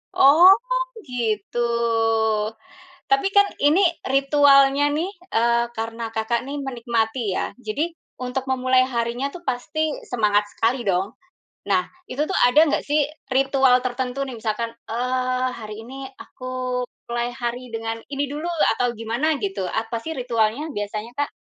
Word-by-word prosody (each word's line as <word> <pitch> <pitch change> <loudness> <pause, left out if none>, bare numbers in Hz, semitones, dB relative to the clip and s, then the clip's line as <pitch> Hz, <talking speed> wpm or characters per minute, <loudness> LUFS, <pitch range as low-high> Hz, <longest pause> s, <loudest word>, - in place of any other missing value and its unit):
Oh, 300 +6 +7 0.6
gitu? 225 -2 -2 1.5
Tapi 410 -1 +3
kan, 405 0 +5 0.2
ini, 295 +5 +5 0.2
ritualnya 275 +1 +4
nih, 315 +5 0 0.2
eee, 235 +1 +2
karena 225 0 -4
Kakak 225 +2 -1
nih 280 +2 -5
menikmati 235 -3 -1
ya. 185 - -2
Jadi, 295 +10 -2 0.2
untuk 255 +1 -3
memulai 255 0 +3
harinya 245 +2 -1
tuh 350 +2 -12
pasti 295 +5 -1 0.2
semangat 210 -4 +3
sekali 235 +4 0
dong? 195 +2 0 0.5
Nah, - - +3 0.2
itu 285 +4 -1
tuh 380 - -1
ada 245 - -3
nggak 295 - +1
sih 295 0 +3 0.2
ritual 265 -1 +3
tertentu 255 +2 -2
nih, 265 - -7
misalkan, 230 +2 -2 0.2
eee, 255 +2 0
"Hari 215 -1 -7
ini 270 +2 -8
aku 255 0 -10 0.6
play 240 0 -2
hari 245 +1 -4
dengan 225 0 -4
ini 280 0 -1
dulu," 295 +5 -4 0.3
atau 245 -1 0
gimana 235 +8 0
gitu, 195 -2 -2
apa 225 +1 -2
sih 320 +3 -5
ritualnya, 245 +4 0
biasanya 210 +3 -4
Kak? 290 - 0
250 Hz, 135 wpm, -23 LUFS, 230-275 Hz, 1.5 s, Oh